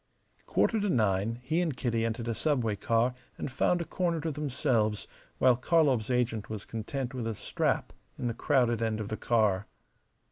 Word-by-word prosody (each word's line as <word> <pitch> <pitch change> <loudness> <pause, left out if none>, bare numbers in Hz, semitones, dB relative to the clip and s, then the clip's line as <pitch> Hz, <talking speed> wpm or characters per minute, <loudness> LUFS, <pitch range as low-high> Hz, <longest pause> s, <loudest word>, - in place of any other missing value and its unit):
Quarter 225 - +2
to 205 - 0
nine 110 - +1
he 155 +7 +1
and 160 -7 -1
Kitty 115 -3 0
entered 115 0 -2
a 115 - 0
subway 120 -5 0
car 115 +5 +1 0.2
and - - -4
found 175 +7 +2
a - - -3
corner 170 0 -1
to 160 +1 -2
themselves, 125 -7 0 0.3
while 125 - +5
Karlov's 130 -4 +2
agent 120 -4 0
was 110 -2 -5
content 120 +3 -4
with 120 -3 -3
a 115 - -2
strap - - -1 0.2
in - - -4
the 120 - 0
crowded 120 -2 +2
end 110 -1 0
of 105 -1 -4
the 110 - -3
car. 105 -4 +2
120 Hz, 180 wpm, -30 LUFS, 110-140 Hz, 0.3 s, while